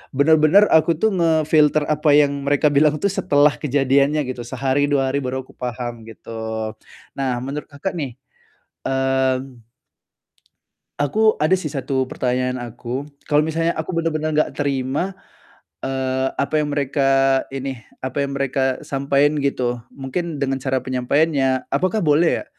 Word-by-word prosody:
bener-bener 155 +7 +5
aku 160 0 +4
tuh 220 -1 +2
nge-filter 155 -3 +3
apa 150 0 +1
yang 140 -1 +1
mereka 145 +2 +3
bilang 150 +1 +4
tuh - - +3
setelah 145 -5 +3
kejadiannya, 140 +1 +2
gitu. 125 -1 -5
Sehari, 135 +3 0
2 135 -2 +2
hari 140 - 0
baru 130 +1 -3
aku - - -17
paham, 120 -2 -5
gitu. 110 -1 -6 0.4
Nah, 130 -3 -1
menurut 140 +3 -5
Kakak 140 +7 -4
nih, 135 -7 -4 0.7
mmm 130 -1 0 1.4
aku 215 +10 +2
ada 155 +5 +3
sih 180 -5 -2
1 135 -2 -2
pertanyaan 125 0 -1
aku. 120 +3 -5 0.2
Kalau 145 - +4
misalnya 165 +1 0
aku 160 +3 -3
bener-bener 155 -2 -1
nggak 155 - +2
terima, 140 +6 -1 0.7
eee, 130 0 -1
apa 140 +2 -1
yang 150 -1 0
mereka 135 -1 +2
ini, 135 -1 -4 0.2
apa 130 +2 -2
yang 140 - -5
mereka 135 -1 -1
sampaiin 140 +2 +1
gitu, 125 -3 -1 0.2
mungkin 145 +3 -4
dengan 135 -1 0
cara 130 -1 -1
penyampaiannya, 130 +1 0
apakah 200 +4 0
boleh 160 +1 +3
ya, - - -11
140 Hz, 140 wpm, -21 LUFS, 130-150 Hz, 1.4 s, bener-bener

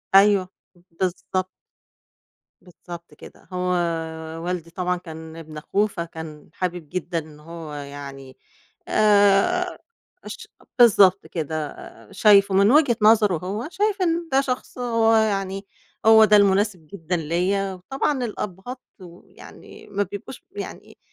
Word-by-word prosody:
أيوه. 195 -2 +5 0.4
بالضبط. 185 +1 -2 1.1
بالضبط 170 -2 -12
كده. - - -15
هو 180 0 -1 0.7
والدي 175 -2 -3
طبعًا 180 +1 -2
كان 160 -2 -10
ابن 155 -2 -10
أخوه 205 +7 0
فكان 160 -5 -8
حابب 175 -4 -4
جدًا 180 -1 -3
إن 150 -1 -12
هو 160 -1 -9
يعني 140 -2 -9 0.5
آآ 210 - +3 0.5
اش - - -9 0.3
بالضبط 195 -5 +6
كده. 155 -2 -3
آآ 115 -5 -13
شايفه 200 -2 +5
من 200 +4 +5
وجهة 280 -6 +4
نظره 210 -5 +5
هو، 200 - -4
شايف 410 0 0
إن 335 -1 0
ده 270 +1 +4
شخص 255 -1 -4
هو 230 -2 +2
يعني 195 -2 0 0.4
هو 220 0 +8
ده 210 0 +5
المناسب 195 -4 +2
جدًا 175 -1 -3
ليّا، 185 +5 -1
وطبعًا 265 +7 -2
الأبّهات 210 +3 -6 0.2
ويعني 175 0 -14
ما 205 0 -1
بيبقوش 205 +7 -9
يعني 410 - -9
190 Hz, 120 wpm, -23 LUFS, 165-215 Hz, 1.1 s, هو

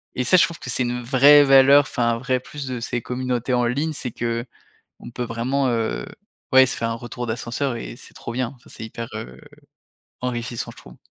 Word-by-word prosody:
et 125 - 0
ça 185 - +5
je - - +6
trouve 170 - -8
que - - -8
c'est 130 - 0
une 125 0 -2
vraie 140 +4 +7
valeur 135 +1 +7
enfin 120 -4 0
un 115 - -1
vrai 130 +1 -1
plus 140 +2 -8
de 125 -2 -4
ces 120 +1 -3
communautés 125 0 -2
en 125 -1 +2
ligne 140 +7 0
c'est 130 -4 -5
qu'on 115 +1 -5 0.5
peut 125 - -4
vraiment, 125 +4 -1
heu, 110 - -1 0.5
ouais 130 0 +8
se 130 - -3
faire 115 - -1
un - - -1
retour 120 +1 -6
d'ascenseur 120 +3 -2
et 115 - -7
c'est - - -15
trop 115 - -7
bien. 125 0 -2
Enfin, 125 - -21
c'est - - -9
hyper, 115 +1 -7
heu, 65 +1 -8 0.8
enrichissant 120 -1 -4
je - - -21
trouve. - - -14
125 Hz, 215 wpm, -22 LUFS, 115-130 Hz, 0.8 s, ouais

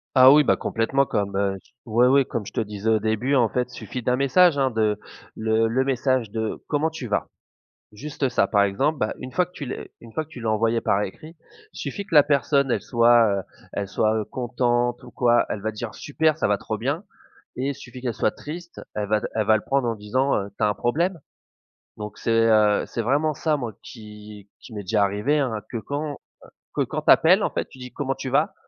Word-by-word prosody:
Ah 130 0 +9
oui, 150 +1 +7
bah - - +3
complètement, 135 +5 0
comme 100 -5 -2
heu, 100 -1 0
t - - -27
oui 120 +2 +3
oui 135 +1 +4
comme 115 -3 -4
je - - -8
te - - -1
disais 105 0 -3
au 110 - +4
début, 110 +6 0
en 120 -4 +4
fait 125 +3 -1
il - - -11
suffit 125 - -6
d'un 125 +1 +1
message 145 +5 +4
hein, 135 -1 +2
de 110 -2 0 0.4
le 110 0 +1
le 125 +4 +1
message 130 -4 0
de: 110 0 -3
«Comment 150 +2 +1
tu 160 -6 -7
vas?» 105 - -1 0.7
Juste 135 +4 -3
ça, 125 - +1
par 100 -2 +3
exemple, 135 +10 0
bah 105 - 0
une 130 - -7
fois 180 +7 +1
que 180 - -25
tu 150 - -7
lé 130 - -7
une 115 -1 -13
fois 155 - -2
que - - -27
tu 125 - -10
l'as 115 -1 -1
envoyé 115 +2 +1
par 100 - +1
écrit, 155 - -8 0.4
il - - -17
suffit 200 - -4
que 180 - -6
la 145 - +8
personne, 140 -2 +2
elle - - 0
soit 120 -1 +4 0.2
heu, - - -4 0.3
elle 100 - -2
soit 110 +2 +1
heu, 110 - -1
contente 120 0 -1
ou 125 - -13
quoi, 120 -1 +3
elle 105 - -3
va 110 +2 -2
dire: 110 +1 -7
«Super, 155 +1 0
ça 160 - 0
va 100 -1 +2
trop - - -4
bien!» - - -2 0.5
Et 130 +2 -2
il 140 - -1
suffit 125 -2 -11
qu'elle 125 -2 -1
soit 105 - +1
triste, 170 +3 -9 0.2
elle 105 -1 -1
va 105 +1 +2
d - - -4
elle 110 -2 +1
va 110 0 +5
le 110 - -4
prendre 135 -2 0
en 115 - 0
disant 130 +6 0
heu 100 -1 -2
«Tu 110 - +1
as - - +3
un 105 - 0
problème?» 165 - -1 0.8
Donc 105 0 -7
c'est - - -2 0.2
heu, 105 -2 +4
c'est 115 - -4
vraiment 145 +7 +1
ça, 155 +2 0
moi, 120 -6 -4
qui 105 -3 -12
qui 115 - -13
m'est 105 - -5
déjà 105 +1 +1
arrivé, 105 +10 +1
hein, 130 -5 0 0.2
que 120 - -3
quand 145 +6 -4
heu, - - -7 0.6
que - - +1
quand - - -3
tu - - +7
appelles, - - +5
en - - 0
fait, - - -3
tu - - -16
dis: 125 -1 -9
«Comment 135 -2 -3
tu 135 0 -5
vas?» 165 +9 +1
120 Hz, 245 wpm, -24 LUFS, 110-140 Hz, 0.8 s, Ah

